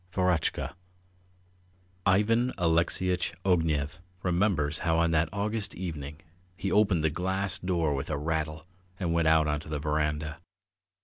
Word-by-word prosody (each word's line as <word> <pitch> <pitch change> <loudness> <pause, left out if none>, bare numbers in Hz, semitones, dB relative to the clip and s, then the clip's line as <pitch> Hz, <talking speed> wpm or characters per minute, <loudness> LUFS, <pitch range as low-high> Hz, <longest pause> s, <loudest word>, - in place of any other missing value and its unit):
VEROTCHKA 90 -2 0 1.3
IVAN 115 +6 +3
ALEXEYITCH 90 +2 +1
OGNEV 80 -5 +1 0.2
remembers 85 -5 +1
how 80 -1 +1
on 85 0 +3
that 80 0 +2
August 105 +1 -2
evening 75 -5 -5 0.4
he 95 - -2
opened 100 -6 +3
the 80 - +2
glass 95 +3 -1
door 85 -5 0
with 70 +1 -3
a 75 - -1
rattle 80 +1 -2 0.3
and 85 -4 0
went 85 -1 +2
out 80 -1 +5
on 75 -1 0
to 75 - -11
the 75 - -2
verandah. 75 +1 -1
85 Hz, 135 wpm, -29 LUFS, 75-95 Hz, 1.3 s, out